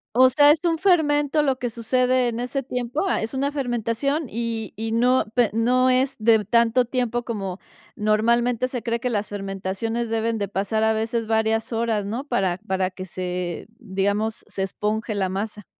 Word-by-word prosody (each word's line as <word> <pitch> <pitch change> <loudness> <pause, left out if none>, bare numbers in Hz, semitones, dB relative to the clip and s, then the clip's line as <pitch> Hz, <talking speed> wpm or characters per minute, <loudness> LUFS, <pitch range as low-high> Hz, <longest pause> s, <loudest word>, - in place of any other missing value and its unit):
O 255 +1 +7
sea, 290 +3 +6
es 305 - +3
un 335 -2 +1
fermento 300 -5 +3
lo 265 -2 0
que 245 - -2
sucede 250 +2 +1
en 235 0 -4
ese 250 +3 -2
tiempo, 250 +6 -2
ah, - - 0
es 220 - -4
una 275 +2 0
fermentación, 265 +2 -1
y 230 -1 -3
y 225 +1 -4
no 250 +3 +3
pe 240 -4 +4
y - - -8
no 250 +3 +3
es 260 +1 +2
de 220 -1 +4
tanto 235 +3 +3
tiempo 240 -1 -1
como 200 -5 -4 0.4
normalmente 235 +3 +2
se 250 -2 -4
cree 235 0 -1
que 250 - -2
las 210 -3 -2
fermentaciones 195 +4 -3
deben 225 0 0
de 200 - -2
pasar 205 +3 -1
a 220 0 +3
veces 225 +1 -2
varias 220 +1 +1
horas, 225 -3 0
¿no? 230 +6 -3
Para 190 -10 0
para 190 -1 0
que 185 0 -8
se, 180 -1 -4
digamos, 205 +1 -1
se 195 - -3
esponje 210 +3 -2
la 195 -2 0
masa. 210 +1 -4
230 Hz, 185 wpm, -23 LUFS, 210-255 Hz, 0.4 s, O